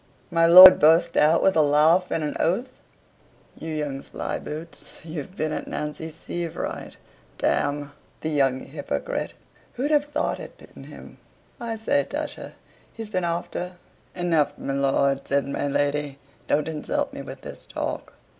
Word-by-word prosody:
My 165 Hz, 0 st, +4 dB
lord 185 Hz, +2 st, +11 dB
burst 165 Hz, +2 st, +4 dB
out, 155 Hz, +3 st, +4 dB
with 190 Hz, -, +3 dB
a 160 Hz, -, +5 dB
laugh 155 Hz, +5 st, +4 dB
and 160 Hz, -, -1 dB
an 150 Hz, -, -3 dB
oath 240 Hz, +10 st, -1 dB, 0.8 s
"You 160 Hz, -, -8 dB
young 145 Hz, -3 st, -3 dB
slyboots, 160 Hz, +4 st, -7 dB
you've 160 Hz, +2 st, -7 dB
been 155 Hz, 0 st, -1 dB
at -, -, -4 dB
Nancy 150 Hz, +2 st, -5 dB
Sievewright. 165 Hz, +1 st, -6 dB, 0.4 s
D -, -, -3 dB, 0.8 s
the 160 Hz, -, -2 dB
young 135 Hz, -3 st, +1 dB
hypocrite, 140 Hz, -, -4 dB, 0.4 s
who'd 280 Hz, +5 st, -2 dB
have 295 Hz, -1 st, +3 dB
thought 295 Hz, -, -2 dB
it -, -, -12 dB
in -, -, -11 dB
him? -, -, -13 dB, 0.4 s
I 230 Hz, -1 st, -4 dB
say, 280 Hz, +6 st, +1 dB
Tusher, -, -, -5 dB, 0.4 s
he's 225 Hz, -2 st, -8 dB
been 185 Hz, -3 st, -1 dB
after 175 Hz, +1 st, -3 dB, 0.2 s
" -, -, -34 dB
"Enough, 170 Hz, -5 st, +1 dB
my 135 Hz, -, -4 dB
lord," 140 Hz, 0 st, +1 dB
said 140 Hz, 0 st, 0 dB
my 140 Hz, +1 st, -2 dB
lady, 145 Hz, 0 st, -1 dB, 0.3 s
"don't 150 Hz, +1 st, +1 dB
insult 155 Hz, -2 st, -3 dB
me -, -, -6 dB
with -, -, -9 dB
this -, -, -10 dB
talk." -, -, -5 dB
160 Hz, 155 wpm, -24 LUFS, 145-180 Hz, 0.8 s, lord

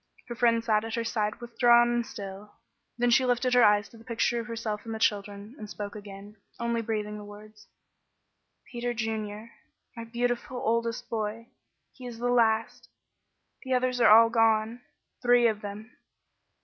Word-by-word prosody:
Her -, -, -3 dB
friend 230 Hz, -1 st, +2 dB
sat 215 Hz, -2 st, +2 dB
at 225 Hz, 0 st, -4 dB
her 230 Hz, -, -1 dB
side 215 Hz, -2 st, -2 dB
withdrawn 240 Hz, 0 st, +4 dB
and 240 Hz, 0 st, 0 dB
still; 200 Hz, -1 st, -9 dB, 0.4 s
then 245 Hz, 0 st, +2 dB
she 260 Hz, -, +5 dB
lifted 250 Hz, 0 st, +1 dB
her 250 Hz, -1 st, +6 dB
eyes 205 Hz, -1 st, +4 dB
to 230 Hz, -, -16 dB
the -, -, -15 dB
picture 235 Hz, 0 st, 0 dB
of 230 Hz, -, -6 dB
herself 225 Hz, -2 st, -4 dB
and 225 Hz, -1 st, -5 dB
the -, -, -4 dB
children 205 Hz, 0 st, -2 dB
and 210 Hz, -, -8 dB
spoke 205 Hz, 0 st, -6 dB
again, 205 Hz, 0 st, -11 dB, 0.2 s
only 235 Hz, 0 st, -1 dB
breathing 210 Hz, -1 st, -3 dB
the -, -, -9 dB
words: 210 Hz, +1 st, -14 dB, 1.0 s
"Peter 240 Hz, -1 st, -3 dB
Junior 220 Hz, -1 st, -4 dB, 0.4 s
my 230 Hz, -, -6 dB
beautiful 245 Hz, +2 st, -2 dB
oldest 230 Hz, 0 st, -1 dB
boy 225 Hz, +1 st, -4 dB, 0.4 s
he 255 Hz, -2 st, -10 dB
is 235 Hz, -2 st, -8 dB
the 245 Hz, +1 st, -1 dB
last 225 Hz, -2 st, +1 dB, 0.7 s
the 260 Hz, -1 st, -1 dB
others 250 Hz, -1 st, 0 dB
are -, -, +6 dB
all 230 Hz, +2 st, +7 dB
gone 225 Hz, 0 st, +2 dB, 0.4 s
three 245 Hz, -1 st, +4 dB
of 215 Hz, -2 st, +1 dB
them." 210 Hz, +3 st, -9 dB
230 Hz, 170 wpm, -28 LUFS, 210-240 Hz, 1.0 s, all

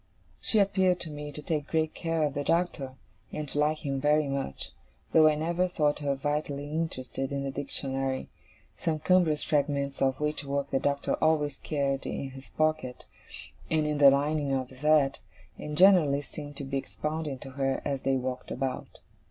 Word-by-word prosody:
She 220 Hz, -, 0 dB
appeared 190 Hz, -3 st, +3 dB
to 160 Hz, -, -3 dB
me 150 Hz, 0 st, -6 dB
to 150 Hz, +1 st, -7 dB
take 150 Hz, -3 st, -2 dB
great 160 Hz, -1 st, 0 dB
care 165 Hz, -2 st, -1 dB
of 145 Hz, -2 st, 0 dB
the 145 Hz, 0 st, -2 dB
Doctor, 165 Hz, -6 st, 0 dB, 0.4 s
and 150 Hz, -1 st, -4 dB
to 145 Hz, -, -1 dB
like 150 Hz, +1 st, +1 dB
him 135 Hz, -1 st, -1 dB
very 150 Hz, +1 st, +3 dB
much, 135 Hz, -, -4 dB, 0.4 s
though 155 Hz, -1 st, +7 dB
I 155 Hz, -, +4 dB
never 170 Hz, +4 st, 0 dB
thought 150 Hz, -5 st, +1 dB
her 140 Hz, -2 st, 0 dB
vitally 145 Hz, 0 st, -2 dB
interested 135 Hz, -4 st, -3 dB
in 140 Hz, 0 st, -2 dB
the 135 Hz, -, -2 dB
Dictionary: 135 Hz, -1 st, -2 dB, 0.5 s
some 160 Hz, -2 st, -1 dB
cumbrous 160 Hz, -1 st, +3 dB
fragments 140 Hz, -2 st, 0 dB
of 135 Hz, -1 st, +2 dB
which 150 Hz, 0 st, -1 dB
work 140 Hz, 0 st, -2 dB
the 135 Hz, -, +2 dB
Doctor 140 Hz, 0 st, 0 dB
always 150 Hz, -3 st, +2 dB
carried 140 Hz, -2 st, -1 dB
in 135 Hz, -, -4 dB
his 135 Hz, 0 st, -12 dB
pockets, 155 Hz, -5 st, 0 dB, 0.6 s
and 155 Hz, -1 st, +2 dB
in 150 Hz, -1 st, -1 dB
the 140 Hz, -1 st, +9 dB
lining 145 Hz, +1 st, +1 dB
of 130 Hz, -1 st, -2 dB
his 130 Hz, -, -14 dB
hat, 150 Hz, -2 st, +3 dB, 0.4 s
and 150 Hz, 0 st, -5 dB
generally 165 Hz, -7 st, +6 dB
seemed 145 Hz, -1 st, -9 dB
to -, -, -5 dB
be 135 Hz, 0 st, -2 dB
expounding 150 Hz, 0 st, -4 dB
to 135 Hz, +1 st, -10 dB
her 135 Hz, 0 st, 0 dB
as 140 Hz, -2 st, -1 dB
they 135 Hz, 0 st, +1 dB
walked 130 Hz, 0 st, -3 dB
about. 130 Hz, +1 st, -4 dB
145 Hz, 185 wpm, -29 LUFS, 135-155 Hz, 0.6 s, the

